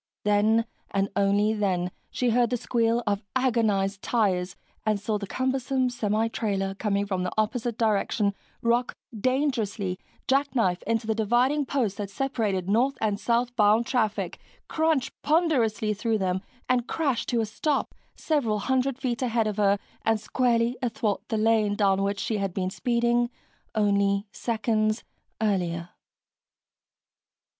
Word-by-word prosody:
Then, 215 +2 +3 0.2
and 195 0 0
only 200 +2 +3
then, 185 -4 0 0.2
she 245 -2 0
heard 240 0 +3
the 245 - 0
squeal 230 0 +1
of 205 -1 0
agonized 215 -6 +1
tires 185 -6 0 0.3
and 215 -2 +1
saw 210 +1 -1
the 200 - -5
cumbersome 260 +1 0
semitrailer 210 -3 -1
coming 200 -2 0
from 190 -2 -2
the 180 0 -2
opposite 225 +1 0
direction 210 -2 +1 0.3
rock 240 +2 +1 0.2
dangerously, 220 -6 0 0.3
jackknife 260 -10 +1
into 225 0 0
the 220 - +1
dividing 245 +6 +2
posts 230 -9 -1
that 200 -2 -3
separated 210 -6 -1
north 250 +6 +2
and 210 -2 0
south 240 +2 0
bound 215 +1 +4
traffic, 220 -5 -1 0.3
crunch 315 -4 +1
ponderously 255 -10 +2
through 220 +2 0
them, 190 -2 -1 0.3
and 250 -1 +1
crash 280 -7 -1
to 240 - +1
a 225 - +1
stop, 275 +7 -1 0.2
several 265 -9 0
hundred 260 +4 0
feet 255 -3 -2
ahead 235 -3 +1
of 215 -1 -2
her 200 -1 +3 0.3
and 225 -1 +2
squarely 235 +1 +1
athwart 220 -4 -1
the 220 - -1
lane 215 -1 +2
down 195 -2 +2
which 200 0 -1
she 220 - -1
had 195 -3 -2
been 185 -1 -1
speeding 240 +1 +1 0.5
only 200 -1 +2
seconds 220 -1 0 0.4
earlier. 175 -5 0
220 Hz, 140 wpm, -26 LUFS, 200-245 Hz, 0.5 s, bound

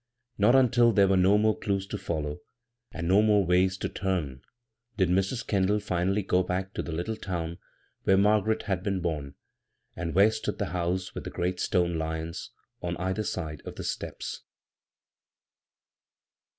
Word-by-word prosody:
Not 110 +5 +5
undl 120 -3 +4
there 100 -2 +6
were 95 - +3
no 95 +2 +5
more 110 0 +3
clews 100 -1 -2
to 105 +1 -5
follow, 75 -1 -3 0.5
and 85 -1 -4
no 95 +4 +5
more 105 -2 +4
ways 90 +1 +3
to - - -2
turn 85 -10 -2 0.6
did 95 -4 +2
Mis. 95 +6 +1
Kendall 100 +1 +1
finally 95 +1 0
go 90 -1 +2
back 95 +2 -3
to - - -2
the - - -6
little 85 +8 -2
town 85 -5 -4 0.4
where 95 - +3
Margaret 105 +2 +3
had 95 -4 -1
been 95 -1 -1
bom, 75 -5 -3 0.6
and 85 -1 -4
where 100 +3 +6
stood 110 0 -3
the - - -2
house 90 +1 -1
with - - -6
the - - -5
great 90 +1 -2
stone 85 -3 +1
lions 80 +1 -4 0.3
on 85 -1 -3
either 95 +4 -1
side 80 -8 -4
of - - -8
the - - -6
steps. - - -5
95 Hz, 165 wpm, -28 LUFS, 85-105 Hz, 0.6 s, there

